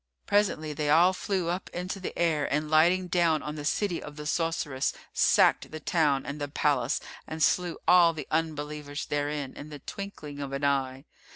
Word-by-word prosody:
Presently 175 -7 +1
they 150 0 -2
all 170 +5 +6
flew 185 -2 -2
up 180 +3 -3
into 180 +2 -4
the 185 - -6
air 155 -4 +1
and 150 +2 -1
lighting 175 +4 +4
down 170 -3 +2
on 150 - -4
the 150 -1 -6
city 175 +4 0
of 150 - -9
the 150 0 -8
sorceress, 160 -4 -1 0.2
sacked - - +4
the 155 - -7
town 145 -4 +1
and 145 +1 -6
the 145 - -1
palace 140 -3 +1 0.3
and 160 0 -2
slew 175 +1 +2
all 175 -2 +7
the 155 -4 -6
Unbelievers 150 -2 -3
therein 145 -2 -2
in 150 - -9
the 150 - -8
twinkling 150 -4 -8
of 140 -1 -5
an 140 +1 -3
eye. 135 -1 0
155 Hz, 185 wpm, -28 LUFS, 145-170 Hz, 0.3 s, all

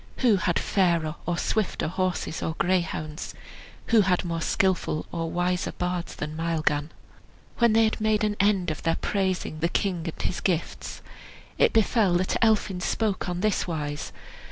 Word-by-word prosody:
Who 220 -5 +6
had 175 -2 +1
fairer 170 -5 +1
or 175 -1 0
swifter 215 -3 0
horses 185 -1 -2
or 160 - -2
greyhounds? 170 -4 -1 0.6
Who 225 - +8
had 185 -2 +1
more 165 -1 -2
skilful 180 -4 +1
or 165 -1 -2
wiser 180 +1 -1
bards 180 -1 -3
than 150 +1 -5
Maelgan? 155 -2 0 0.7
When 235 -2 +5
they 225 +1 +5
had 220 - +1
all - - -11
made 215 0 +2
an 210 -1 +1
end 195 -4 +2
of 155 - -5
their 165 - +1
praising 190 -5 -1
the 170 +2 +1
king 180 -4 -1
and - - -9
his 185 - -1
gifts, 175 -4 -2 0.6
it - - +5
befell 220 -3 +3
that 185 +1 +1
Elphin 210 -4 +2
spoke 200 -1 -1
on 175 0 -2
this 215 -2 +1
wise. 150 -3 -3
180 Hz, 165 wpm, -26 LUFS, 165-200 Hz, 0.7 s, Who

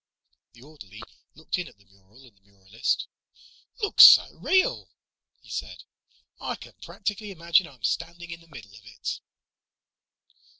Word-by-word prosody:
The 120 - -18
orderly 110 -9 -13 0.3
looked 160 +4 -4
in 180 - -5
at - - -17
the 100 - -27
mural 100 +5 -23
and 115 -5 -21
the 100 - -33
muralist. 100 +2 -4 0.8
"Looks 415 - +7
so - - +6
real," 380 +7 +1 0.5
he - - -15
said, - - -6 0.6
"I - - -4
can - - -14
practically 205 +1 -5
imagine 170 -1 +1
I'm 130 -7 -19
standing 170 - -3
in 165 0 -9
the 165 - -21
middle 110 -10 -13
of 100 0 -16
it." 105 -1 -6
135 Hz, 145 wpm, -25 LUFS, -, 0.8 s, Looks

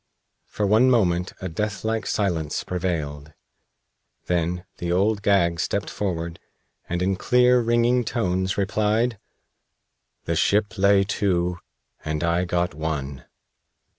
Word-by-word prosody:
For 105 - -2
one 110 +6 +4
moment 90 -7 +2
a 95 - -3
deathlike 105 +5 -2
silence 85 -8 -1
prevailed. 75 -5 -3 0.9
Then 90 0 -1
the 85 0 -2
Old 100 +4 +2
Gag 85 -5 +2
stepped 100 +5 -2
forward 85 -4 -3 0.5
and 90 +1 -1
in 95 +1 +1
clear, 125 +4 +4
ringing 120 +1 +2
tones 95 -5 -1
replied: 105 +3 +1 1.1
"The 85 - -1
ship 105 +6 +1
lay 100 0 +4
to, 90 -3 0 0.4
and 75 +1 -2
I 85 +2 +1
got 90 -1 -1
one." 70 -4 -4
95 Hz, 115 wpm, -24 LUFS, 85-105 Hz, 1.1 s, one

